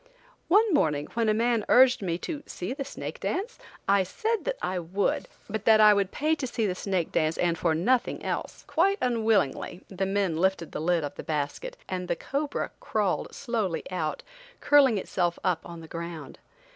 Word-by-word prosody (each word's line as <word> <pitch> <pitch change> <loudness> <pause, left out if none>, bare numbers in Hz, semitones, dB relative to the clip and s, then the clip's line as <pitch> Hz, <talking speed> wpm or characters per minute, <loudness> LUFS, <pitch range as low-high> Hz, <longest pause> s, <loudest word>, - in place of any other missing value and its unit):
One 415 +2 +4
morning, 150 - +2
when 230 -1 +1
a - - +4
man 230 -1 +2
urged 255 -2 +6
me 170 -3 -1
to 300 -4 -4
"See 180 +7 -4
the 275 0 -4
snake 275 - -7
dance?" 440 +6 -3 0.3
I 200 0 +5
said 440 - -2
that - - -1
I 185 - -2
would, 180 +4 -1 0.2
but 215 0 -4
that 220 -1 +6
I 210 -1 +8
would 200 -2 +1
pay 305 +2 +1
to 270 - -3
see 230 -2 -1
the 190 - 0
snake 185 -2 -2
dance 155 0 +1
and 170 -1 +1
for 165 -1 +1
nothing 235 +10 +1
else. - - -4
Quite 390 +5 +2
unwillingly 220 - 0
the 195 0 -2
men 195 -4 0
lifted 180 -2 0
the - - -4
lid 170 0 +1
of 145 -1 -4
the - - -6
basket, 160 - -3
and 180 -1 -3
the 175 - 0
cobra 280 - -3
crawled - - -1
slowly 225 -10 -2
out, 160 -4 -2 0.4
curling 275 -6 +5
itself 175 -2 -1
up 180 -3 +1
on 170 -1 -9
the 160 - -11
ground. 165 -3 -7
195 Hz, 190 wpm, -27 LUFS, 170-255 Hz, 0.4 s, I